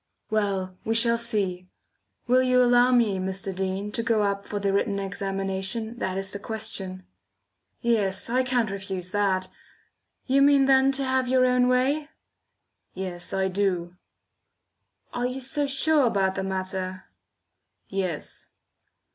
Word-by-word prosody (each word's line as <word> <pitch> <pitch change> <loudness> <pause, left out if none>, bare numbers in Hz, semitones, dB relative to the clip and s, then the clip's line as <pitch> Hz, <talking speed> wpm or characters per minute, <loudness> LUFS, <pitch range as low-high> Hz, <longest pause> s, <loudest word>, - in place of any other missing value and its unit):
"Well, 195 -4 -1
we 225 - -1
shall 230 0 +3
see. 195 -6 0 0.6
Will 255 +1 +4
you 255 -1 +4
allow 245 +1 +5
me, 225 -6 +3
Mr. 190 0 -3
Dean, 190 +2 -3
to 230 - -1
go 225 -2 +1
up 200 0 -2
for 205 - -4
the 200 -1 0
written 200 0 0
examination, 195 +3 -3
that 185 0 -2
is 195 0 -3
the 200 - -6
question?" 190 -4 -3 0.8
"Yes, 205 -5 +1
I 250 +2 +2
can't 245 -5 0
refuse 190 -2 -5
that. 190 -3 +1 0.8
You 275 +1 +3
mean 280 -1 +5
then 270 0 +5
to 275 +1 -1
have 260 -1 0
your 255 0 +3
own 250 0 +3
way?" 270 +4 +1 0.9
"Yes, 185 -2 -5
I 190 0 0
do." 180 -2 -1 1.2
"Arc 245 0 -1
you 255 +1 -5
so 280 +3 -1
sure 280 0 +3
about 195 -4 +1
the 190 - -3
matter?" 185 -1 -4 0.8
"Yes." 185 -5 -4
205 Hz, 140 wpm, -25 LUFS, 190-250 Hz, 1.2 s, allow